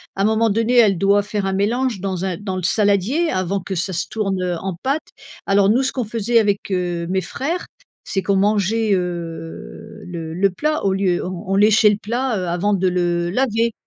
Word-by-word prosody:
Un 195 - 0
moment 220 +2 +2
donné, 225 +4 +1
elle 210 -6 +5
doit 200 +3 +3
faire 205 -1 -3
un 195 - -1
mélange 230 +3 0
dans 185 -1 -3
un 185 -3 -2
dans 195 -2 -4
le 185 - -4
saladier 210 - +2
avant 185 +1 -1
que 190 +1 -5
ça 185 +2 -1
se 175 +1 -1
tourne, 195 -4 -2
heu, 180 -1 -1
en 190 +1 -4
pâte. 280 +4 -1 0.4
Alors 195 0 +3
nous 245 +5 +3
ce 265 - 0
qu'on 250 -3 -2
faisait 230 +2 +1
avec, 205 -2 0
heu, 175 -2 -1
mes 190 0 0
frères. 310 - -3 0.4
C'est 195 - -2
qu'on 200 - +1
mangeait, 210 +2 +2
heu, 175 +4 -6
le 165 -2 -6
le 195 +4 +2
plat 305 +11 -2
au 195 - +2
lieu, 190 -2 0
on 185 +2 -6
on - - +2
léchait 210 +1 +5
le 205 - -1
plat, 240 +3 -2
heu, 180 - -3
avant 180 +4 0
de 190 -1 +1
le 175 -1 0
laver. 230 +1 0
200 Hz, 210 wpm, -20 LUFS, 185-220 Hz, 0.4 s, elle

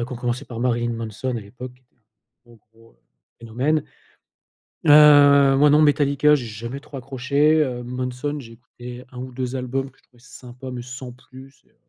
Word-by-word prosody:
en - - -2
a - - -3
qui 130 - -9
ont 125 - -5
commencé 125 +2 -3
par 120 -4 -8
Marilyn 120 -1 0
Manson 115 +2 -5
à - - -4
l'époque 125 +5 -10
qui 125 - -29
était 125 - -44
un 115 - -44 0.4
gros 120 -1 -19
gros, 115 0 -22
heu, - - -34 0.4
phénomène 130 +7 -1 1.0
heu, 145 -2 +7
moi 145 +1 +5
non 150 +1 +5
Metallica 145 0 +3
j'ai 125 -4 -6
jamais 115 +5 -7
trop 140 0 -12
accroché, 140 +4 +1
heu, 125 -3 -5
Manson 125 +4 -4
j'ai 115 -5 -11
écouté 120 +1 -12
1 125 - -11
ou 130 +1 -7
2 130 +1 -4
albums 130 +2 -3
que - - -31
je - - -31
trouvais 120 -2 -26
sympa 125 +1 -11
mais 125 -1 -6
sans 125 +1 -9
plus 130 +1 -16
et - - -32
heu, - - -36
125 Hz, 210 wpm, -22 LUFS, 120-140 Hz, 1.0 s, heu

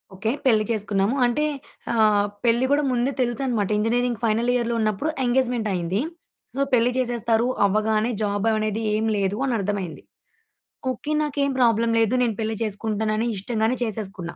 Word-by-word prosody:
Okay. 220 +4 -1
పెళ్లి 220 -4 +4
చేసుకున్నాము. 205 +1 0
అంటే 245 +5 +1 0.5
ఆహ్, 210 -2 +3 0.2
పెళ్లి 235 +2 +3
గూడా 290 +1 +3
ముందే 250 +2 +1
తెలుసనమాట. 240 -4 0
ఇంజినీరింగ్ 235 +2 0
ఫైనల్ 230 +2 +1
ఇయర్‌లో 235 -1 0
ఉన్నప్పుడు 215 +7 0 0.2
ఎంగేజ్‌మెంటయింది. 225 -7 0 0.5
సో, 275 - 0
పెళ్లి 245 0 +4
చేసేస్తారు 235 -2 +1 0.2
అవ్వగానే, 215 +3 +1
జాబవనేది 215 +1 0
ఏమి 220 +1 +1
లేదు 200 +1 0
అనర్థమయింది. 205 -7 -2 0.9
ఓకే. 255 +4 -5
నాకేం 280 -1 0
ప్రాబ్లమ్ 230 -1 +3
లేదు. 225 +1 +2
నేను 230 -3 0
పెళ్లి 220 0 -1
చేసుకుంటానని 215 +1 -1
ఇష్టంగానే 220 +4 -1
చేసేసుకున్నా. 195 -6 -5
225 Hz, 130 wpm, -23 LUFS, 210-240 Hz, 0.9 s, పెళ్లి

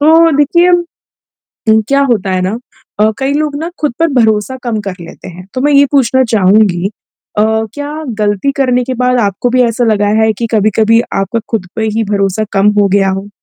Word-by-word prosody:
तो 325 +2 +5
देखिए 340 +5 +3
अ, - - +5 1.1
क्या 275 0 +2
होता 195 -4 0
है 185 0 0
ना 190 +5 -2 0.4
अ, 215 +1 +3
कई 270 +1 -1
लोग 300 -1 -1
ना 330 - -3
खुद 295 -5 0
पर 330 - +3
भरोसा 220 +3 0
कम 235 -3 -2
कर 185 - -4
लेते 170 - -11
हैं, 180 +1 -11
तो 255 - -3
मैं 290 +1 +2
ये 280 0 +6
पूछना 260 -2 +2
चहूँगी 195 -2 +3 0.5
अ, 210 - +4 0.3
क्या 295 +2 -6 0.2
गलती 205 +6 0
करने 250 -2 +1
के 260 - -4
बाद 250 0 +2
आपको 205 +4 -1
भी 255 +1 +2
ऐसा 235 +1 0
लगा 205 -1 +1
है 220 0 +3
कि 235 - -2
कभी-कभी 220 +2 +2
आपका 195 +4 -1
खुद 205 -5 -2
पे 220 - -2
ही 225 - +1
भरोसा 200 +1 0
कम 195 +1 +2
हो 200 - +3
गया 195 0 +2
हो? 195 +2 -4
225 Hz, 200 wpm, -12 LUFS, 200-275 Hz, 1.1 s, ये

